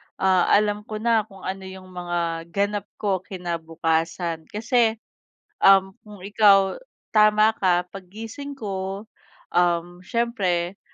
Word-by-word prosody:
ah, 185 -2 +3
alam 210 0 +2
ko 215 - -5
na 225 -3 +2
kung 195 -3 -15
ano 190 0 -5
yung 190 0 -11
mga 170 -2 -3
ganap 200 +3 -1
ko 195 -3 -1
kinabukasan. 165 -2 -3
Kasi, 225 +1 +1 0.7
um, 195 -1 +6
kung 205 -3 -13
ikaw 200 -1 +4 0.3
tama 215 0 +5
ka 180 -2 +3
pag 195 -1 -9
gising 225 +8 -8
ko, 195 -3 -4 0.5
um, 175 0 +1
siyempre 190 -5 -1
190 Hz, 120 wpm, -23 LUFS, 175-210 Hz, 0.7 s, um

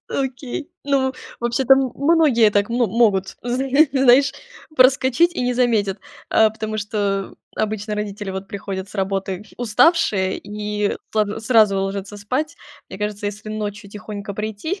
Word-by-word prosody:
Окей. 270 +3 -4
Ну, 270 -2 +1 0.3
вообще-то 240 +3 +4
м 265 -2 0
многие 280 -7 +4
так 205 +1 +1
мо 240 0 +1
могут, 195 -3 +1
зн 245 +2 -1 0.3
знаешь, 270 0 +5 0.4
проскочить 265 +6 +4
и - - -2
не 250 0 0
заметят. 220 -6 +1 0.3
А 220 -1 +5
потому 220 0 -5
что 200 -2 -2 0.2
обычно 215 0 -2
родители, 205 -1 -4
вот, 190 +1 -6
приходят 195 -1 -5
с - - -16
работы 195 0 -2
уставшие 215 - +2
и 210 0 -3 0.2
сл 210 -1 0
сразу 215 -4 +4
ложатся 195 +1 -4
спать. 260 +11 -3 0.3
Мне 190 - -9
кажется, 210 0 -3
если 210 +1 -6
ночью 210 -1 -5
тихонько 205 -1 -7
прийти. 220 - -4
215 Hz, 140 wpm, -21 LUFS, 200-255 Hz, 0.4 s, знаешь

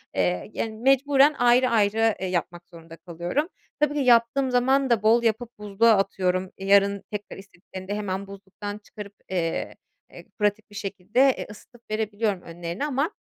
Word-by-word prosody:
Eee, 90 -1 -1
yani, 225 - -3
mecburen 275 +4 +4
ayrı 245 +1 +4
ayrı, 220 0 +2
eee, 190 - -3
yapmak 175 -1 -4
zorunda 165 -1 -13
kalıyorum. 175 - -3 0.3
Tabii 295 -1 +2
ki 295 - -2
yaptığım 250 +1 +3
zaman 265 +2 +2
da 230 -3 +2
bol 230 +2 +4
yapıp 230 +1 0
buzluğa 210 +2 +3
atıyorum. 185 -1 -1
Yarın 200 0 +3
tekrar 210 -1 -6
istediklerinde 190 0 -9
hemen 200 -1 -4
buzluktan 200 +1 -8
çıkarıp, 210 -1 -11 0.2
eee, 170 -3 -2 0.4
eee, - - -13
pratik 210 +1 0
bir 205 - -15
şekilde, 195 +3 -3 0.2
eee, - - -6
ısıtıp 230 +3 -16
verebiliyorum 215 -2 -1
önlerine. 170 +8 -5
Ama, 290 +4 -1
205 Hz, 155 wpm, -25 LUFS, 190-240 Hz, 0.4 s, mecburen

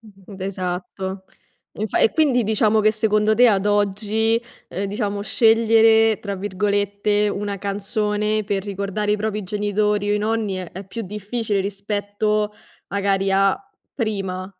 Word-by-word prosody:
d 200 -3 -14
esatto. 190 0 -4 0.5
Infa 215 -1 -1
e - - +4
quindi 270 -7 +3
diciamo 215 0 +2
che 215 0 +4
secondo 215 0 +2
te, 245 +2 +6
ad 200 -2 +2
oggi, 210 +2 +1 0.3
uhm, 195 - -3
diciamo 205 0 -2
"scegliere", 225 0 +4
tra 200 -1 -4
virgolette, 205 +1 0
una 200 0 -3
canzone 210 +1 -1
per 200 -1 -1
ricordare 200 +1 -2
i - - +2
propri 210 0 -2
genitori 205 +1 0
o - - +3
i - - +1
nonni, 215 -1 -1
è 185 -2 -6
è 190 +1 -8
più 230 +4 -6
difficile 210 +1 -2
rispetto, 205 +1 -1 0.4
magari, 195 -1 0
a 195 0 +3 0.4
prima? 195 -6 -3
205 Hz, 140 wpm, -21 LUFS, 195-215 Hz, 0.5 s, te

